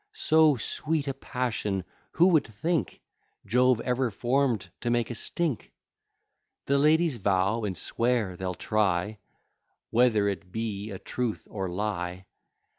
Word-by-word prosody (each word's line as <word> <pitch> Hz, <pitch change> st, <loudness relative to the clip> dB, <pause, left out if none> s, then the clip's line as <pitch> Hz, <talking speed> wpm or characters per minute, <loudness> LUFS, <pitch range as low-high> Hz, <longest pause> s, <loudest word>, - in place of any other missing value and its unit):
So 160 Hz, -, +4 dB
sweet 150 Hz, +5 st, -2 dB
a 135 Hz, -, 0 dB
passion 110 Hz, -8 st, -2 dB, 0.3 s
who 175 Hz, +3 st, +5 dB
would 160 Hz, -5 st, +3 dB
think, 155 Hz, +10 st, -2 dB, 0.4 s
Jove 125 Hz, +2 st, +3 dB
ever 125 Hz, 0 st, 0 dB
form'd 120 Hz, -3 st, 0 dB
to 120 Hz, -, -2 dB
make 120 Hz, 0 st, +1 dB
a -, -, -2 dB
stink? 150 Hz, +1 st, -2 dB, 0.9 s
The 140 Hz, 0 st, +2 dB
ladies 155 Hz, -1 st, +3 dB
vow 100 Hz, +2 st, +1 dB
and 95 Hz, -4 st, -3 dB
swear, 115 Hz, -2 st, 0 dB
they'll 90 Hz, 0 st, -4 dB
try, 105 Hz, +1 st, 0 dB, 0.7 s
Whether 115 Hz, -4 st, +4 dB
it 95 Hz, -2 st, -4 dB
be 110 Hz, -1 st, -3 dB
a 95 Hz, -, -6 dB
truth 120 Hz, +2 st, -3 dB
or 95 Hz, -3 st, -3 dB
lie. 90 Hz, -1 st, -3 dB
115 Hz, 130 wpm, -27 LUFS, 100-130 Hz, 0.9 s, who